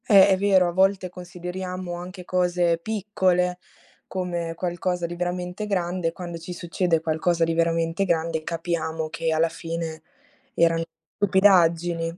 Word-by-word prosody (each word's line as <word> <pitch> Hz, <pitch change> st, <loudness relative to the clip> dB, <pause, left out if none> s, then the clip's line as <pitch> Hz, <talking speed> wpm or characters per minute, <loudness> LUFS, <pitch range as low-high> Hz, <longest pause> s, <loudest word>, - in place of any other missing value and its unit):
Eh, 200 Hz, -2 st, +8 dB
è 190 Hz, -, +4 dB
vero, 190 Hz, -2 st, +4 dB
a -, -, -1 dB
volte 190 Hz, +1 st, +2 dB
consideriamo 180 Hz, 0 st, -6 dB
anche 180 Hz, +1 st, -8 dB
cose 175 Hz, -2 st, +1 dB
piccole 185 Hz, -3 st, 0 dB, 0.5 s
come 175 Hz, -3 st, -3 dB
qualcosa 175 Hz, 0 st, -2 dB
di 170 Hz, +1 st, -5 dB
veramente 180 Hz, +3 st, -3 dB
grande, 180 Hz, -3 st, -1 dB
quando 175 Hz, -1 st, -7 dB
ci 165 Hz, +2 st, -7 dB
succede 175 Hz, -1 st, 0 dB
qualcosa 165 Hz, +1 st, +1 dB
di 165 Hz, 0 st, +1 dB
veramente 165 Hz, +2 st, +1 dB
grande 165 Hz, -3 st, 0 dB
capiamo 160 Hz, -1 st, -2 dB
che 165 Hz, 0 st, -2 dB
alla 160 Hz, +1 st, +3 dB
fine 165 Hz, -1 st, -5 dB, 0.5 s
eran 165 Hz, 0 st, +3 dB, 0.3 s
stupidaggini 175 Hz, -4 st, +3 dB
175 Hz, 135 wpm, -24 LUFS, 165-185 Hz, 0.5 s, Eh